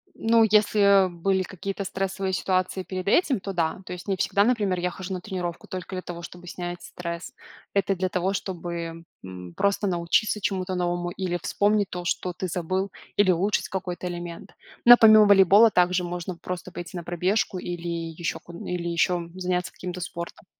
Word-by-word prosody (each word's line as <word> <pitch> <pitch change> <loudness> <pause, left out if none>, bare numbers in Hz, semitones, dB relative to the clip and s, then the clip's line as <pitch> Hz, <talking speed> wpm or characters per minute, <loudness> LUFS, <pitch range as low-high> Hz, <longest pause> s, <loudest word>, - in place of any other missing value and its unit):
Ну, 225 0 +4
если, 205 -2 +5
э, - - -6
были 190 +3 0
какие-то 195 +2 -5
стрессовые 190 0 -2
ситуации 185 0 0
перед 185 0 -5
этим, 270 - +3
то 195 +1 -5
да. 170 0 -1
То - - -6
есть 180 - -9
не 195 - +1
всегда, 200 +2 +2
например, 210 -6 +1
я 180 +1 -1
хожу 190 +2 -7
на 180 - -4
тренировку 180 -4 -5
только 185 +1 -6
для 185 - -4
того, 170 -1 -7
чтобы 175 +1 -10
снять 175 0 -6
стресс. 170 -1 -6 0.4
Это 200 0 +1
для 185 0 -1
того, 185 +2 0
чтобы, 170 -3 -5 0.2
м, 90 -2 -9
просто 200 0 +1
научиться 175 +4 +1
чему-то 190 -2 -2
новому 175 0 -1
или 175 -1 -3
вспомнить 205 -1 +1
то, 175 -1 -6
что 180 0 -1
ты 185 - -4
забыл, 185 +3 -2 0.3
или 195 -2 +5
улучшить 190 +4 0
какой-то 180 -1 -4
элемент. 175 -1 -7 0.3
Но 240 0 +11
помимо 215 -2 +8
волейбола 200 +2 +7
также 180 0 +3
можно 175 0 -5
просто 180 0 -6
пойти 175 +1 -8
на 175 - -4
пробежку 185 +4 0
или 175 -1 -5 0.3
еще 170 0 -3
ку 170 - -14
или 175 -1 -3
еще 170 0 0
заняться 180 -1 -2
каким-то 180 0 -6
спортом. 170 0 -7
185 Hz, 180 wpm, -25 LUFS, 175-195 Hz, 0.4 s, Но